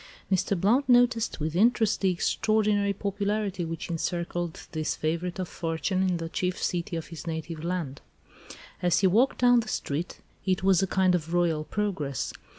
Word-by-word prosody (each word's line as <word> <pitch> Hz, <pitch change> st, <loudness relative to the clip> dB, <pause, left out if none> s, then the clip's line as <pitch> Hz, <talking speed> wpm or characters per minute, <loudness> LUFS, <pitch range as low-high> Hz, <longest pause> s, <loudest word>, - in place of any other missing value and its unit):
Mr. 190 Hz, 0 st, +1 dB
Blount 245 Hz, +9 st, +2 dB
noticed 245 Hz, -4 st, +3 dB
with 155 Hz, +1 st, -2 dB
interest 220 Hz, +2 st, +3 dB
the 195 Hz, -, +3 dB
extraordinary 205 Hz, +2 st, +1 dB
popularity 200 Hz, -1 st, -2 dB
which 165 Hz, 0 st, -5 dB
encircled 170 Hz, 0 st, -3 dB
this 155 Hz, -1 st, -2 dB
favourite 170 Hz, +3 st, -2 dB
of 185 Hz, -1 st, -3 dB
fortune 165 Hz, +4 st, -2 dB
in 185 Hz, -2 st, +1 dB
the 165 Hz, -1 st, -4 dB
chief 180 Hz, +2 st, -2 dB
city 170 Hz, -1 st, -2 dB
of 160 Hz, -3 st, -5 dB
his 165 Hz, +1 st, -9 dB
native 160 Hz, 0 st, -4 dB
land. 170 Hz, -6 st, -3 dB, 0.8 s
As 175 Hz, 0 st, +2 dB
he -, -, +3 dB
walked 225 Hz, +9 st, +3 dB
down 245 Hz, -1 st, +5 dB
the 225 Hz, -, -3 dB
street 160 Hz, -4 st, -3 dB, 0.2 s
it 185 Hz, -1 st, 0 dB
was 190 Hz, -2 st, +4 dB
a 195 Hz, -, +1 dB
kind 185 Hz, 0 st, +2 dB
of 170 Hz, -1 st, -1 dB
royal 165 Hz, -3 st, +2 dB
progress. 165 Hz, -, -2 dB
180 Hz, 165 wpm, -27 LUFS, 165-205 Hz, 0.8 s, down